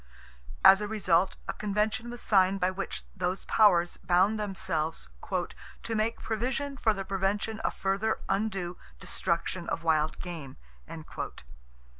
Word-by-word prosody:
As 195 Hz, +1 st, +9 dB
a 210 Hz, -, -2 dB
result 190 Hz, -4 st, +2 dB
a -, -, -1 dB
Convention 210 Hz, +3 st, -1 dB
was 240 Hz, 0 st, -7 dB
signed 195 Hz, -1 st, +4 dB
by 185 Hz, 0 st, +2 dB
which 195 Hz, +1 st, -5 dB
those 185 Hz, 0 st, -2 dB
powers 175 Hz, -6 st, +4 dB
bound 190 Hz, +5 st, +2 dB
themselves 185 Hz, -, -2 dB, 0.7 s
"to 230 Hz, -, -3 dB
make 220 Hz, +2 st, 0 dB
provision 255 Hz, +5 st, -2 dB
for 230 Hz, -4 st, +2 dB
the 195 Hz, -2 st, -3 dB
prevention 195 Hz, +3 st, -1 dB
of -, -, -2 dB
further 195 Hz, +3 st, 0 dB
undue 195 Hz, -3 st, -1 dB, 0.2 s
destruction -, -, -1 dB
of 165 Hz, -, -2 dB
wild 155 Hz, -1 st, +1 dB
game." 165 Hz, -7 st, -7 dB
195 Hz, 130 wpm, -29 LUFS, 180-215 Hz, 0.7 s, As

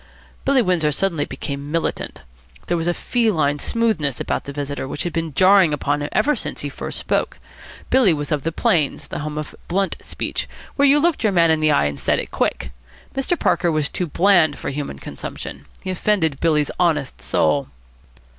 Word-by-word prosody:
Billy 270 Hz, -3 st, +4 dB
Windsor 170 Hz, -6 st, +2 dB
suddenly 165 Hz, -2 st, 0 dB
became 140 Hz, +2 st, -6 dB
militant. 165 Hz, 0 st, -2 dB, 0.4 s
There 175 Hz, -, 0 dB
was 165 Hz, 0 st, -1 dB
a 175 Hz, -, +2 dB
feline 160 Hz, -, +1 dB
smoothness 185 Hz, -, 0 dB
about -, -, -2 dB
the 140 Hz, -, -5 dB
visitor 140 Hz, -1 st, -4 dB
which 140 Hz, -, -4 dB
had 175 Hz, -, -3 dB
been 165 Hz, -4 st, -3 dB
jarring 185 Hz, -3 st, +6 dB
upon 145 Hz, 0 st, -1 dB
him 145 Hz, -, -3 dB
ever 290 Hz, +8 st, +2 dB
since -, -, -5 dB
he -, -, -3 dB
first -, -, -5 dB
spoke. -, -, -1 dB, 0.5 s
Billy 255 Hz, -7 st, +5 dB
was 145 Hz, -2 st, -2 dB
of 150 Hz, -2 st, +1 dB
the 165 Hz, -, -2 dB
plains, 160 Hz, -2 st, +1 dB
the -, -, -4 dB
home 150 Hz, 0 st, -4 dB
of 150 Hz, -1 st, -5 dB
blunt 195 Hz, +2 st, 0 dB
speech, -, -, -4 dB, 0.3 s
where 285 Hz, 0 st, +4 dB
you 285 Hz, +2 st, +6 dB
looked 335 Hz, +1 st, +2 dB
your 215 Hz, -, +3 dB
man 170 Hz, -3 st, +4 dB
in 160 Hz, -, +2 dB
the 155 Hz, 0 st, +3 dB
eye 145 Hz, -, +3 dB
and 70 Hz, -1 st, -2 dB
said -, -, +2 dB
it -, -, -4 dB
quick. -, -, -1 dB, 0.4 s
Mr. 270 Hz, +6 st, -1 dB
Parker 175 Hz, -, +2 dB
was 155 Hz, -2 st, 0 dB
too 180 Hz, -, -2 dB
bland 170 Hz, -3 st, +4 dB
for -, -, -4 dB
human 140 Hz, -, -4 dB
consumption. -, -, -8 dB, 0.2 s
He 185 Hz, -, -2 dB
offended 175 Hz, -6 st, +1 dB
Billy's 150 Hz, -3 st, +2 dB
honest 155 Hz, -6 st, +1 dB
soul. 140 Hz, -2 st, +1 dB
160 Hz, 195 wpm, -21 LUFS, 145-195 Hz, 0.5 s, jarring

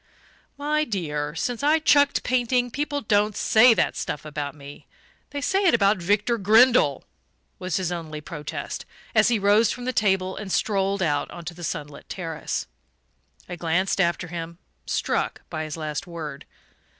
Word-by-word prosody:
"My 300 Hz, +2 st, +1 dB
dear, 150 Hz, -, -3 dB
since 240 Hz, +8 st, -2 dB
I've 305 Hz, +2 st, +3 dB
chucked 285 Hz, -2 st, +4 dB
painting 245 Hz, 0 st, +1 dB
people 290 Hz, +2 st, -2 dB
don't 210 Hz, -2 st, +1 dB
say 230 Hz, +1 st, +6 dB
that -, -, +1 dB
stuff 150 Hz, -, -4 dB
about 145 Hz, -2 st, -5 dB
me 140 Hz, -1 st, -12 dB, 0.4 s
they 285 Hz, -, -5 dB
say 385 Hz, +7 st, +1 dB
it 350 Hz, -, +5 dB
about 205 Hz, -1 st, +3 dB
Victor 205 Hz, +6 st, +1 dB
Grindle," 215 Hz, -, +5 dB, 0.6 s
was 185 Hz, 0 st, -2 dB
his 185 Hz, -2 st, -2 dB
only 160 Hz, -3 st, -5 dB
protest, 150 Hz, -2 st, -6 dB, 0.3 s
as 215 Hz, -1 st, +5 dB
he 235 Hz, -1 st, +3 dB
rose 205 Hz, +2 st, +4 dB
from 245 Hz, -, -6 dB
the 255 Hz, -, -1 dB
table 190 Hz, -3 st, +1 dB
and 205 Hz, -3 st, -6 dB
strolled 195 Hz, -1 st, +1 dB
out 145 Hz, -3 st, 0 dB
onto 170 Hz, 0 st, -7 dB
the 175 Hz, +1 st, -11 dB
sunlit 150 Hz, -2 st, -6 dB
terrace. 165 Hz, -4 st, -4 dB, 0.8 s
I 175 Hz, -, -5 dB
glanced 175 Hz, +3 st, 0 dB
after 175 Hz, 0 st, 0 dB
him, 170 Hz, -1 st, -6 dB, 0.3 s
struck -, -, -1 dB
by 155 Hz, 0 st, -3 dB
his 155 Hz, +1 st, -6 dB
last 155 Hz, +4 st, -4 dB
word. 160 Hz, -5 st, -7 dB
190 Hz, 160 wpm, -24 LUFS, 160-235 Hz, 0.8 s, say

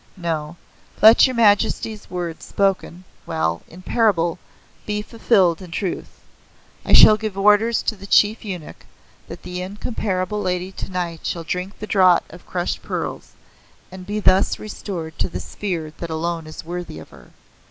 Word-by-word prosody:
No. 165 Hz, -2 st, -3 dB, 0.4 s
Let 220 Hz, +5 st, +8 dB
Your 260 Hz, -, -3 dB
Majesty's 215 Hz, -1 st, +2 dB
words 175 Hz, -2 st, -5 dB
spoken 190 Hz, -2 st, -1 dB, 0.2 s
well 80 Hz, +1 st, -1 dB
in 180 Hz, +3 st, -13 dB
parable, 180 Hz, -8 st, +1 dB, 0.5 s
be 210 Hz, 0 st, -2 dB
fulfilled 195 Hz, -7 st, +2 dB
in 185 Hz, -, -10 dB
truth. 180 Hz, +2 st, -4 dB, 0.6 s
I -, -, -3 dB
shall 215 Hz, -, +9 dB
give 215 Hz, -3 st, -5 dB
orders 210 Hz, +3 st, +4 dB
to 220 Hz, -, -1 dB
the 200 Hz, 0 st, -11 dB
Chief 210 Hz, +2 st, +4 dB
Eunuch 180 Hz, -7 st, -7 dB, 0.4 s
that -, -, -10 dB
the 180 Hz, 0 st, -5 dB
Incomparable 200 Hz, 0 st, -3 dB
Lady 180 Hz, -1 st, -2 dB
tonight 180 Hz, -3 st, -4 dB
shall 170 Hz, -, -3 dB
drink 180 Hz, +4 st, -4 dB
the 215 Hz, -, -6 dB
Draught 185 Hz, -4 st, +4 dB
of 175 Hz, -, -14 dB
Crushed 175 Hz, -1 st, -2 dB
Pearls, -, -, -5 dB, 0.6 s
and 185 Hz, 0 st, -10 dB
be 210 Hz, +1 st, -2 dB
thus 195 Hz, -1 st, +3 dB
restored 175 Hz, -7 st, -7 dB
to -, -, 0 dB
the -, -, -5 dB
sphere 165 Hz, -7 st, -4 dB
that 170 Hz, -, -5 dB
alone 165 Hz, 0 st, -3 dB
is 155 Hz, -, -9 dB
worthy 175 Hz, -, -6 dB
of 80 Hz, -, -11 dB
her. -, -, -16 dB
185 Hz, 155 wpm, -21 LUFS, 170-210 Hz, 0.6 s, shall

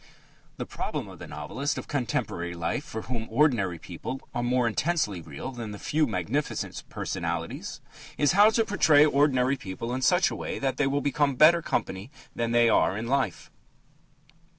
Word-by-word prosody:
The -, -, -4 dB
problem -, -, -4 dB
of -, -, -12 dB
the -, -, -8 dB
novelist 85 Hz, -, -3 dB
of -, -, -6 dB
contemporary 90 Hz, -, -2 dB
life 85 Hz, -, -2 dB
for 110 Hz, -5 st, -6 dB
whom 115 Hz, -2 st, -4 dB
ordinary 115 Hz, -, +2 dB
people 90 Hz, +10 st, -6 dB
are 120 Hz, -, -1 dB
more 125 Hz, 0 st, +1 dB
intensely 115 Hz, -, 0 dB
real 80 Hz, -, -7 dB
than 120 Hz, -4 st, -6 dB
the 105 Hz, -, -7 dB
few 150 Hz, +7 st, +1 dB
magnificent 115 Hz, -, -2 dB
personalities -, -, -4 dB, 0.4 s
is 145 Hz, -2 st, +3 dB
how 205 Hz, +3 st, +7 dB
to 225 Hz, 0 st, +1 dB
portray 155 Hz, -8 st, +5 dB
ordinary 140 Hz, -3 st, +2 dB
people 115 Hz, +2 st, -5 dB
in 130 Hz, -, -2 dB
such 180 Hz, +7 st, +3 dB
a -, -, -4 dB
way -, -, -4 dB
that 135 Hz, -1 st, -1 dB
they 145 Hz, -, +2 dB
will 140 Hz, +1 st, 0 dB
become 145 Hz, -1 st, +1 dB
better 165 Hz, +5 st, +6 dB
company 95 Hz, -6 st, -3 dB, 0.3 s
than 115 Hz, 0 st, -1 dB
they 120 Hz, 0 st, +5 dB
are 100 Hz, -3 st, +3 dB
in 110 Hz, -, -4 dB
life. 130 Hz, -6 st, -1 dB
125 Hz, 175 wpm, -27 LUFS, 105-145 Hz, 0.4 s, how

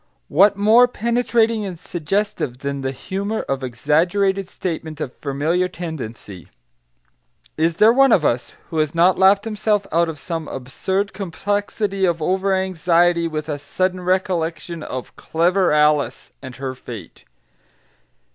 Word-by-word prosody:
What 200 Hz, +6 st, +5 dB
more 220 Hz, +5 st, +6 dB
penetrating 235 Hz, -2 st, +1 dB
and 185 Hz, -4 st, -5 dB
suggestive 175 Hz, -5 st, -2 dB
than 140 Hz, 0 st, -2 dB
the 135 Hz, -, -1 dB
humour 200 Hz, -, -3 dB
of 135 Hz, -1 st, -3 dB
exaggerated 175 Hz, -, +1 dB
statement 160 Hz, -4 st, -5 dB
of 125 Hz, -, -4 dB
familiar 155 Hz, +6 st, -1 dB
tendency? 125 Hz, -, -7 dB, 1.1 s
Is 165 Hz, +1 st, +1 dB
there 220 Hz, +2 st, +6 dB
one 270 Hz, 0 st, +5 dB
of 160 Hz, -8 st, +4 dB
us 120 Hz, -2 st, -1 dB, 0.2 s
who 160 Hz, -, -1 dB
has 155 Hz, +1 st, 0 dB
not 175 Hz, +3 st, +4 dB
laughed 195 Hz, +2 st, +5 dB
himself 210 Hz, -2 st, 0 dB
out 170 Hz, 0 st, +2 dB
of 160 Hz, -, -6 dB
some 165 Hz, +1 st, -5 dB
absurd 190 Hz, +10 st, -3 dB
complexity 200 Hz, +1 st, -2 dB
of 170 Hz, -2 st, 0 dB
over 190 Hz, +4 st, +1 dB
anxiety 175 Hz, -2 st, +2 dB
with 155 Hz, -1 st, -4 dB
a 145 Hz, -2 st, -3 dB
sudden 185 Hz, +6 st, -1 dB
recollection 175 Hz, -2 st, -1 dB
of 130 Hz, -4 st, -6 dB
"clever 180 Hz, +3 st, +1 dB
Alice" 150 Hz, -1 st, +2 dB
and 130 Hz, -2 st, -9 dB
her 130 Hz, 0 st, -4 dB
fate? 115 Hz, -8 st, -10 dB
175 Hz, 135 wpm, -21 LUFS, 150-195 Hz, 1.1 s, more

